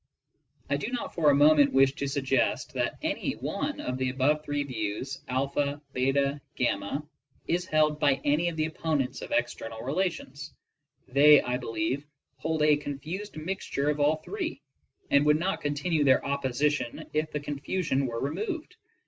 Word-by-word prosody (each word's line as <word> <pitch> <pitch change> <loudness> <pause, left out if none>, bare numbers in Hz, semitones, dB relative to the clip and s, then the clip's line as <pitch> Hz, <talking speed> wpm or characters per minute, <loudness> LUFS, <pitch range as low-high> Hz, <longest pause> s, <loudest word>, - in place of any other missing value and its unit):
I 140 - +1
do 145 - -4
not 280 +2 -4
for 155 -4 +3
a 140 - +5
moment 145 0 +6
wish 135 0 +5
to 140 - -2
suggest 135 -2 0
that - - -1
any - - -1
one - - -3
of 125 +1 -3
the 130 0 +1
above 140 +4 +1
three 145 -1 -1
views 125 +1 -4
(a), 130 +2 0
()3), 140 -1 -1 0.3
(y), 100 +7 -4 0.5
is 175 +1 0
held 155 -1 +2
by 145 -3 +4
any 150 +4 +2
of 170 - -6
the 155 - +1
opponents 155 -4 -2
of - - -8
ex 295 - +1
ternal 115 +1 -8
relations. 150 -2 -3 0.5
They, 145 +3 +7
I 125 0 -1
believe, 140 +4 -2 0.3
hold 160 +3 -1
a 150 -1 +5
confused 155 +8 -6
mixture 155 -3 -1
of 150 - -4
all 145 +2 +4
three, 345 - -5 0.5
and 140 0 +5
would 150 0 +4
not 190 +5 -1
continue 150 +2 0
their 130 -2 +4
opposition 140 -1 -1
if 155 +1 0
the 150 - -2
confusion 145 0 -1
were 115 -1 -3
removed. 330 - -4
145 Hz, 165 wpm, -28 LUFS, 135-155 Hz, 0.5 s, They